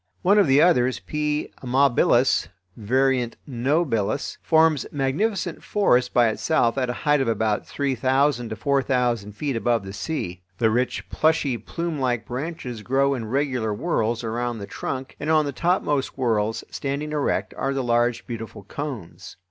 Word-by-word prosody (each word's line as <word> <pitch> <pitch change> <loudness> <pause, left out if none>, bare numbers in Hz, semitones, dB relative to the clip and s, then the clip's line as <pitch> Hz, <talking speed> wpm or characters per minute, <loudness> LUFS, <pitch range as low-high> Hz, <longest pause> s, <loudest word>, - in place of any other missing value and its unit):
One 200 +3 +5
of 200 - +4
the 135 +2 +5
others 130 -8 +3
(P. 150 0 -2
amabilis, 130 - +3 0.3
var. 130 +5 +2 0.4
nobilis) 130 - 0
forms 160 -3 +3
magnificent 165 +7 -1
forests 125 -12 +2
by 120 -2 +4
itself 115 +1 +1
at 130 -1 0
a - - 0
height 150 -1 +4
of 135 - 0
about 110 -2 0
three 140 -2 -1
thousand 130 0 +1
to 110 - -4
four 140 +3 +1
thousand 120 -6 0
feet 140 +4 -3
above 115 -2 0
the 95 - -7
sea. 95 - -4 0.2
The 110 0 +2
rich 125 +3 -1
plushy, 155 -5 +2
plumelike 130 - -2
branches 125 -3 -5
grow 135 +4 +2
in 120 -4 -4
regular 125 -3 -1
whorls 115 -5 -1
around 120 +1 -2
the 100 - -6
trunk, 130 +6 -5
and 150 - -3
on 155 -1 +4
the 145 - -2
topmost 150 -2 0
whorls, 115 -4 0
standing 140 +2 -3
erect, 150 -2 -1
are 135 - -1
the 135 - -1
large, 120 0 +1
beautiful 115 -4 -7
cones. 125 - -7
130 Hz, 155 wpm, -24 LUFS, 115-145 Hz, 0.4 s, One